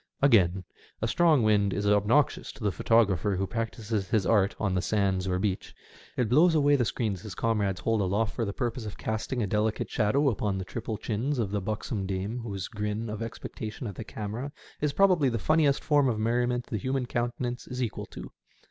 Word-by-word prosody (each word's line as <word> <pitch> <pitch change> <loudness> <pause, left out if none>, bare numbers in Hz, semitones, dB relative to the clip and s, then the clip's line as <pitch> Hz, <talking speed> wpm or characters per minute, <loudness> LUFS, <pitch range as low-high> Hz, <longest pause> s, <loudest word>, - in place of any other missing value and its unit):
Again, 95 -9 +4 0.4
a 110 - 0
strong 155 -1 +4
wind 100 -2 +3
is 105 - -2
obnoxious 105 +7 +2
to - - -11
the 105 - +2
photographer 100 0 +2
who 95 +1 0
practises 110 -2 -3
his 105 -4 +2
art 100 -3 +3
on 100 -4 0
the 90 - +1
sands 95 -3 0
or 90 -1 0
beach. 95 0 -2 0.4
It 125 - +2
blows 160 +8 +5
away 145 -1 +4
the 125 -4 +2
screens 105 -5 -2
his 105 -4 -8
comrades 105 -5 0
hold 115 -2 +1
aloft 100 +3 0
for 120 - -2
the 100 - -2
purpose 120 +1 -3
of 105 - -7
casting 110 +2 -2
a - - +1
delicate 105 +2 -1
shadow 135 +7 +2
upon 105 -4 -1
the 95 - -4
triple 105 +6 -4
chins 120 +8 -2
of 110 -5 -1
the 105 -1 -1
buxom 105 0 -3
dame 100 +5 -3
whose 100 -6 -5
grin 105 +1 -3
of 110 +1 -5
expectation 115 +1 -6
at 105 - -4
the 110 - -7
camera 110 +6 -5 0.3
is 150 -1 +1
probably 180 -5 +4
the 115 - -1
funniest 150 +4 +2
form 145 -3 +3
of 115 - -1
merriment 120 +2 0
the 110 - -3
human 130 +4 -1
countenance 120 0 -3
is 125 0 -3
equal 110 -5 -4
to. - - -9
110 Hz, 200 wpm, -28 LUFS, 100-125 Hz, 0.4 s, blows